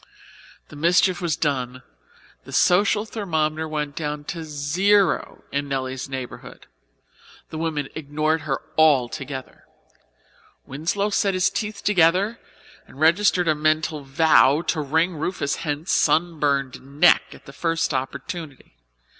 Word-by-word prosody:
The - - -12
mischief 175 +4 +2
was 170 -3 0
done, 130 -6 -2 0.6
the - - -12
social 205 +3 +3
thermometer 160 -7 -2
went 150 -2 -4
down 150 -2 -4
to 165 -2 -6
zero 170 +6 +1
in 140 0 -2
Nelly's 130 -1 -4
neighbourhood. 130 -2 -8 0.9
The 155 - -5
women 155 -4 -2
ignored 155 +1 -1
her 135 -2 -3 0.2
altogether. 135 -2 0 1.0
Winslow 175 +9 -2
set 200 -1 +1
his 185 +2 +2
teeth 210 0 -4
together 195 +4 +2 0.5
and 135 - -15
registered 180 +2 +3
a 155 - +4
mental 155 0 0
vow 145 +1 +4
to 155 - 0
wring 160 +4 0
Rufus 150 -2 -2
Hent's 150 +3 -3
sunburned 145 -5 +1 0.2
neck 175 0 +6
at - - -16
the 140 - -12
first 165 +1 -1
opportunity. 135 - -6
155 Hz, 120 wpm, -23 LUFS, 140-175 Hz, 1.0 s, neck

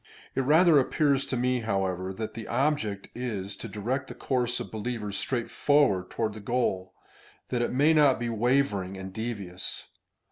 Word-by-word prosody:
It - - +1
rather 155 +3 +6
appears 140 0 +2
to 130 - -1
me, 125 +1 +1
however, 95 -4 -1
that 110 +2 -5
his 115 - -6
object 120 -6 0
is 105 -6 -4
to 115 - -6
direct 120 +6 -3
the - - -8
course 125 -2 0
of - - -6
believers 110 -2 -4
straight 120 +2 -2
forward 140 -11 +3
toward 110 -2 -2
the 110 - -8
goal, 100 -5 -1 0.5
that 125 -2 0
it 120 - 0
may 145 +5 +4
not 145 -5 +5
be 120 - -2
wavering 115 -5 +1
and 95 0 -7
devious. 100 -5 -5
120 Hz, 170 wpm, -28 LUFS, 100-130 Hz, 0.5 s, rather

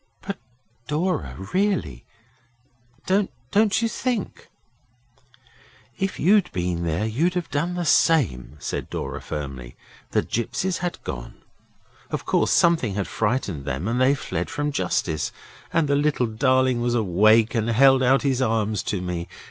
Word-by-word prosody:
'But, 200 0 -5 0.5
Dora 150 - -1 0.2
really, 185 - 0 1.0
don't 195 +1 +2 0.5
you - - +3
think 245 +1 -3 0.7
' - - -30
'If 195 0 -2
you'd 200 +2 +4
been 90 -1 -2
there 85 +6 0
you'd 155 +12 0
have 175 -2 -3
done 170 +5 -1
the 175 -1 -2
same,' 80 - +2
said - - -4
Dora - - -4
firmly. 70 -5 -6 0.3
'The - - +1
gipsies 170 - -2
had 175 -1 -3
gone. - - -6 0.7
Of - - -4
course - - +2
something 160 - +3
had 100 -2 -1
frightened 105 - -1
them 70 +8 -3
and 120 +2 0
they 135 +2 +4
fled 90 -9 -4
from 145 0 -2
justice. 90 - -1 0.4
And 165 -3 +2
the 140 - +2
little 145 -3 +1
darling 130 +2 +2
was 120 0 0
awake 110 +2 +4
and 115 -1 0
held 135 +3 +5
out 130 +1 +3
his 135 -2 +1
arms 110 -4 0
to 100 -4 -2
me. 90 -1 -4
120 Hz, 145 wpm, -24 LUFS, -, 1.0 s, held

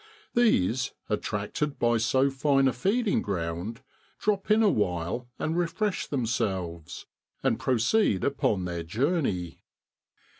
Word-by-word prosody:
These, 130 - +2 0.2
attracted 105 +8 -2
by 120 0 +2
so 130 +4 +2
fine 135 0 +3
a 130 - +2
feeding 200 - +1
ground, 90 +5 -3 0.4
drop 205 -1 -1
in 215 +1 +5
awhile 105 - 0
and 160 - -1
refresh 180 +4 -1
themselves, 95 - -2 0.4
and - - +1
proceed 120 - +2
upon 105 -9 +1
their 85 -1 -3
journey. 105 - -1
120 Hz, 110 wpm, -27 LUFS, -, 0.4 s, in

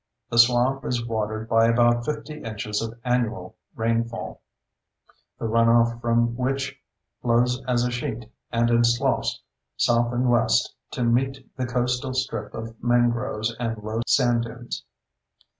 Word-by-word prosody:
The 115 - +2
swamp 125 +3 +4
is 120 -2 -2
watered 110 -1 -3
by 115 0 +4
about 120 0 +3
50 150 +1 -5
inches 105 -1 -3
of 115 +1 -6
annual 115 -7 -1 0.2
rainfall, 115 0 -2 1.0
the - - -5
runoff 115 +1 +3
from 120 0 +1
which 135 +2 -2 0.5
flows 125 +1 +2
as 120 -1 +2
a 125 - -1
sheet 120 -2 -4 0.3
and 120 0 +2
in 120 0 +4
sloughs 120 0 +1 0.3
south 120 0 +2
and 125 +1 0
west 120 -1 +2 0.2
to 125 - -1
meet 130 +3 0
the 130 -1 -2
coastal 125 +2 -1
strip 115 -5 -2
of 115 0 -8
mangroves 120 -2 +1
and 115 -2 -2
low 110 +2 -2
sand 120 -3 +3
dunes. 120 +1 -7
120 Hz, 140 wpm, -24 LUFS, 115-125 Hz, 1.0 s, swamp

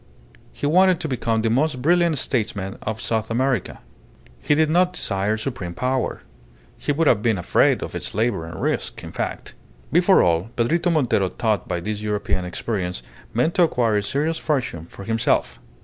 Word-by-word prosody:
He - - -5
wanted 180 +3 +4
to 160 - -2
become 115 -4 -1
the 115 - +1
most 140 +2 +1
brilliant 170 +2 +3
statesman 105 -7 -2
of 110 0 -4
South 110 -1 -1
America. 125 -2 0 0.6
He 150 - +2
did 155 +1 +3
not 180 +3 +3
desire 100 +2 -1
supreme 105 -8 -5
power. 130 0 -1 0.5
He - - -2
would 160 +3 +1
have 115 -7 +4
been 110 -2 +2
afraid 90 - +2
of - - -6
its - - -4
labour 110 -7 0
and 80 - -8
risk, - - -2
in - - -8
fact. - - -4 0.4
Before 180 +4 +5
all, 85 +4 +1
Pedrito 165 +9 +1
Montero, 125 - +2
taught 105 0 -1
by 85 - -2
his 105 +2 -3
European 105 -3 -1
experience, 90 - -3 0.3
meant 125 +9 +1
to - - +2
acquire 120 -10 +2
a - - +1
serious 150 +9 -1
fortune 120 - -2
for 100 - -11
himself. 105 - 0
115 Hz, 175 wpm, -22 LUFS, 100-150 Hz, 0.6 s, Before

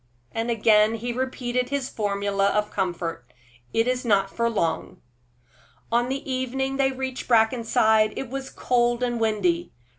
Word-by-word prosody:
And 225 +1 -2
again 215 -1 +4
he 240 +2 -3
repeated 250 -1 -2
his 280 -2 -1
formula 200 -1 0
of 210 +1 0
comfort, 170 -8 -3 0.4
"It 225 +1 +1
is 255 0 0
not 195 -4 +2
for 235 0 +1
long." 170 -8 -2 0.9
On 240 +1 +2
the 275 +1 -4
evening 265 +1 -2
they 270 -1 +2
reached 260 -1 -5
Brackenside 220 -2 +3
it 270 - -3
was 270 +2 -5
cold 240 0 +1
and 240 -1 -1
windy. 335 +11 0
235 Hz, 145 wpm, -25 LUFS, 215-255 Hz, 0.9 s, again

